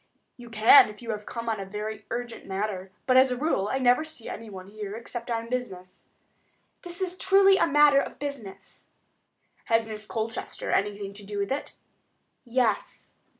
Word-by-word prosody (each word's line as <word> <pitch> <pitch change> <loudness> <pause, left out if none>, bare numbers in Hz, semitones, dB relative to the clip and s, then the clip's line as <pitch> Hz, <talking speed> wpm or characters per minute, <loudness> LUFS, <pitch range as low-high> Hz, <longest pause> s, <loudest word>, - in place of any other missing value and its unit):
"You 240 -1 -12
can, 220 -1 +7
if 210 +3 -12
you 230 - -3
have 210 -1 -6
come 230 -1 -6
on 220 -2 -1
a - - -3
very 210 +2 -6
urgent 240 -1 -5
matter; 195 -1 -3
but, 255 0 +4
as 260 0 +6
a 250 - -2
rule, 245 -8 0
I - - +1
never 250 +2 +3
see 310 -7 -9
anyone 205 -4 -8
here 210 -1 -6
except 235 +1 -7
on 230 -1 -2
business." 195 -8 -6 0.7
"This 350 +1 -6
is 365 -1 -2
truly 390 +1 +5
a - - +3
matter 295 -1 +6
of - - -7
business." 275 -9 -8 0.8
"Has 225 -1 +2
Miss 215 -1 -8
Colchester 225 0 -4
anything 200 0 -1
to 205 +1 -9
do 205 +1 -6
with 200 +2 -2
it?" 275 - -3 0.7
"Yes." 240 -3 -1
230 Hz, 175 wpm, -27 LUFS, 210-260 Hz, 0.8 s, can